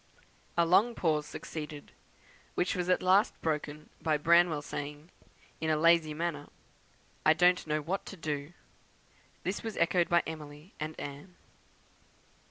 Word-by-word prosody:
A 170 - +5
long 210 +8 +4
pause 155 -3 0
succeeded, 150 -2 -7 0.6
which 180 - 0
was 180 -1 -2
at 185 - +2
last 190 +3 +3
broken 150 -1 -3
by 155 -2 +2
Branwell 165 -1 +4
saying, 150 +4 -6 0.5
in 160 - -1
a 155 - +3
lazy 165 -1 +4
manner, 160 -3 -3 0.8
'I 155 - +6
don't 180 +1 +3
know 155 0 0
what 185 +6 -2
to 195 - -8
do.' 150 0 -4 0.9
This 190 +3 -2
was 225 -2 -5
echoed 170 +1 +2
by 170 0 +4
Emily 155 +2 -9
and 155 +1 -5
Anne. 145 +6 -8
160 Hz, 140 wpm, -31 LUFS, 150-175 Hz, 0.9 s, I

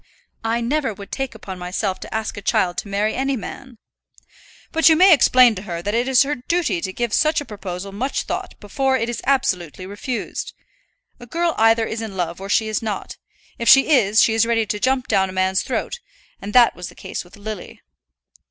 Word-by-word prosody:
"I 230 +1 0
never 260 -2 -1
would 200 0 -11
take 270 -3 -4
upon 190 -4 -8
myself 185 +2 -3
to - - -10
ask 220 0 -3
a 205 - -7
child 180 -2 +1
to - - -7
marry 205 +2 0
any 270 +1 -1
man." 255 +2 -9 0.9
"But 325 +1 +5
you 320 - +6
may 365 +2 +7
explain 255 -4 +6
to 185 - -7
her 170 -4 -6
that 205 - -2
it 240 +2 +1
is 265 0 +5
her 285 +2 -2
duty 250 - -1
to 190 - -3
give 235 +2 -3
such 310 0 +3
a 290 - -6
proposal 195 -3 -7
much 250 +8 -2
thought - - -5
before 265 +6 0
it 230 -1 -2
is 240 - -4
absolutely 185 - 0
refused. 205 +6 -5 0.6
A 240 - -12
girl 335 +5 0
either 225 0 +4
is 225 +1 -4
in 210 -4 -6
love 175 0 -3
or 195 - -7
she 220 +2 +2
is 215 - -2
not. 220 -2 -5 0.4
If 235 - +1
she 270 +3 +7
is, 220 -6 +5
she 225 - +2
is 225 0 +2
ready 230 -1 +1
to 210 0 -3
jump 260 +2 0
down 190 -3 +2
a - - -8
man's 190 0 +1
throat; 480 - -3 0.4
and 200 - -6
that 245 -2 +6
was 180 +1 -7
the - - -16
case - - -6
with 175 - -17
Lily." 205 -2 -8
225 Hz, 215 wpm, -21 LUFS, 195-260 Hz, 0.9 s, may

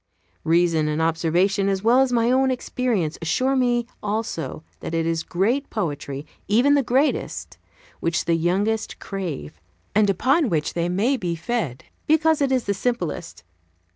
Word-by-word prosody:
Reason 165 -1 +3
and 150 +1 -1
observation, 175 +5 +1
as 195 0 -1
well 235 +3 +5
as 265 -1 +3
my 235 0 +2
own 265 +1 +3
experience, 245 -9 -1
assure 255 +12 +1
me 245 -2 +2 0.2
also 205 - -3 0.2
that 165 - -4
it 165 0 0
is 165 -1 0
great 225 - 0
poetry 145 -7 -4 0.2
even 240 +8 +4
the 285 - +4
greatest 265 +4 -1 0.4
which 165 -1 -1
the 170 - +2
youngest 195 +7 0
crave, 170 - -6 0.3
and 210 -1 +4
upon 265 - +2
which 155 -4 -1
they 170 0 -1
may 220 +10 +1
be 175 -6 -2
fed, 165 - -3 0.2
because 315 0 +3
it 275 -1 +2
is 255 -2 +2
the 200 - 0
simplest. 185 - -3
200 Hz, 155 wpm, -23 LUFS, 165-245 Hz, 0.4 s, well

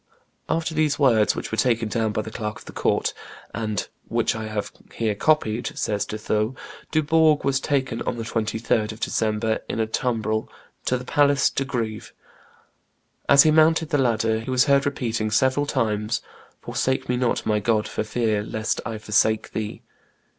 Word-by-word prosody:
After 160 0 0
these 155 -2 +1
words, 115 -7 +4
which - - -5
were 110 - -1
taken 115 -1 +2
down 110 0 0
by 105 +1 -2
the 110 - -8
clerk 105 -1 -4
of - - -14
the - - -9
court, - - 0 0.4
"and 110 -2 -2 0.2
which - - +1
I 110 -1 -4
have 105 -1 -3 0.2
here 110 -2 0
copied," 120 -1 0
says 105 -1 -1
De 110 - -4
Thou, 110 +3 -1 0.3
Dubourg 155 0 +3
was 135 -1 +1
taken 130 -4 -1
on - - -2
the 115 - -3
23d 110 -1 -1
of 110 - -13
December, 110 0 0
in - - -2
a 110 - +2
tumbrel 110 -1 -1 0.4
to 125 - +1
the 125 - -8
Place 140 0 +3
de 135 - -1
Greve. 115 -5 -4 1.2
As 140 0 +8
he 155 - +4
mounted 160 0 +4
the 145 - +1
ladder 115 -3 +1
he 115 - -7
was 130 0 +3
heard 140 0 +3
repeating 115 -6 -1
several 130 +6 +2
times, 105 -2 -1 0.4
"Forsake 130 0 -1
me 125 - +1
not, 125 -1 0
my 105 -1 +2
God, 110 0 +1
for - - -3
fear 110 -1 0
lest 110 +1 -2
I 115 -2 -4
forsake 110 +1 +1
thee." 110 -1 -5
115 Hz, 175 wpm, -24 LUFS, 110-135 Hz, 1.2 s, As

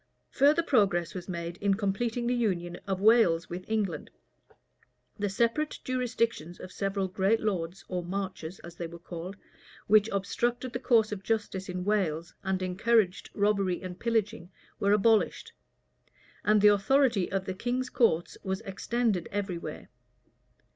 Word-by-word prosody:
Further 295 +5 +4
progress 195 - +2
was 185 0 -7
made 170 -1 -4
in 200 -1 +1
completing 225 +4 -1
the 245 - +1
union 180 -8 -1
of 190 -1 -1
Wales 200 -7 +4
with 180 +1 -5
England: 215 -4 -1 1.1
the 205 0 0
separate 235 +9 0
jurisdictions 230 -9 -1
of 185 - -9
several 195 -1 -1
great 195 +4 +1
lords, 185 -4 -3
or 180 -1 -3
marchers, 185 -1 -4
as 170 0 -11
they 170 - -4
were 170 +1 -10
called, 175 +2 -8 0.5
which 215 +1 +5
obstructed 240 +5 -1
the - - -2
course 225 -4 +3
of 205 -2 -4
justice 200 -3 -2
in 180 0 -4
Wales, 170 -6 0
and 190 -1 -1
encouraged 190 +1 +1
robbery 200 -3 +1
and 180 -1 -8
pillaging, 225 -5 -1 0.3
were 200 - +2
abolished; 210 +1 +2 0.9
and 210 0 +4
the 210 - +8
authority 205 0 +3
of 190 0 -1
the 190 - -3
king's 250 +6 -2
courts 175 -9 +1
was 190 -1 -2
extended 200 -1 -1
every 195 -4 -2
where. - - -8
200 Hz, 145 wpm, -29 LUFS, 180-225 Hz, 1.1 s, the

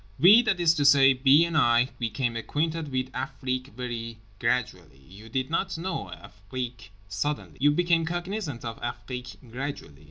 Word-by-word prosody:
We, 195 - +8
that 195 -6 0
is 170 -2 +4
to 150 -3 0
say, 140 -1 +6
B. 135 +5 +5
and 170 -1 -4
I, 120 -3 +4
became 120 +1 -2
acquainted 155 +5 -2
with 130 0 -2
Afrique 130 -1 -3
very 115 -2 -5 0.2
gradually. 90 - -2
You 100 +5 -13
did 130 +5 -2
not 190 +1 -1
know 165 - -4
Afrique 115 +4 -8 0.2
suddenly. 105 +9 -4
You 145 - +5
became 170 +2 +2
cognisant 175 - -4
of 115 -1 -6
Afrique 125 -1 -6 0.2
gradually. 130 - -6
130 Hz, 155 wpm, -26 LUFS, 115-160 Hz, 0.2 s, We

